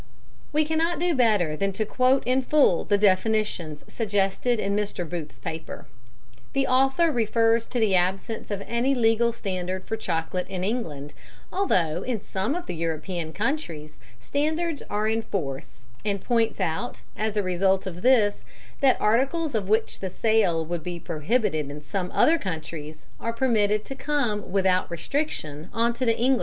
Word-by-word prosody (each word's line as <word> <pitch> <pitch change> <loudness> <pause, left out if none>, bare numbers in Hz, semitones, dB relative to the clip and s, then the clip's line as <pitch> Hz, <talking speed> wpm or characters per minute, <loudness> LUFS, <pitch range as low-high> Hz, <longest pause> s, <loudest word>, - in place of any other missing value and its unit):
We 305 +1 +2
cannot 320 +2 +1
do 350 +2 +1
better 210 - +3
than 195 +4 -1
quote 255 +6 +2
in 255 +1 +2
full 265 - +3
the 205 - +3
definitions 200 -5 +1
suggested 210 +2 0
in 200 0 0
Mr. 205 -4 -2
Booth's 160 -4 -6
paper. 160 0 -6 0.7
The 275 0 +2
author 270 +6 +3
refers 230 -1 +2
to 245 - -2
the 215 -4 +3
absence 190 +5 0
of 200 -1 -3
any 245 +4 +1
legal 235 0 +3
standard 185 -4 -4
for 225 - -2
chocolate 175 -3 -2
in 185 -1 -4
England, 160 - -3 0.4
although 180 - +1
in 235 0 -2
some 195 +8 -2
of 355 0 -4
the - - -4
European 165 0 -3
countries 170 - -3 0.2
standards 310 - -1
are 210 +1 0
in 225 +1 +1
force, 135 - -5 0.2
and 200 -1 -1
points 230 -3 +1
out, 185 +6 -2
as 215 0 -2
a 205 - +2
result 190 +1 +2
of 180 -2 -6
this, 225 -5 +4 0.4
that 270 -2 +4
articles 275 +8 +1
of 205 -4 -1
which 220 +1 +1
the 190 - -3
sale 185 -5 +2
would 170 0 -3
be 175 +1 -5
prohibited 160 - 0
in 145 +1 -7
some 180 +3 -3
other 330 +1 +4
countries, 155 - -6
are 230 - -2
permitted 215 -4 +2
to - - -5
come 270 -9 -1
without 190 -1 +2
restriction 170 - -3
on 230 +2 +1
to 255 +2 -2
the 230 -1 +2
English 245 +3 +2
market. 260 - +3
210 Hz, 165 wpm, -25 LUFS, 180-245 Hz, 0.7 s, this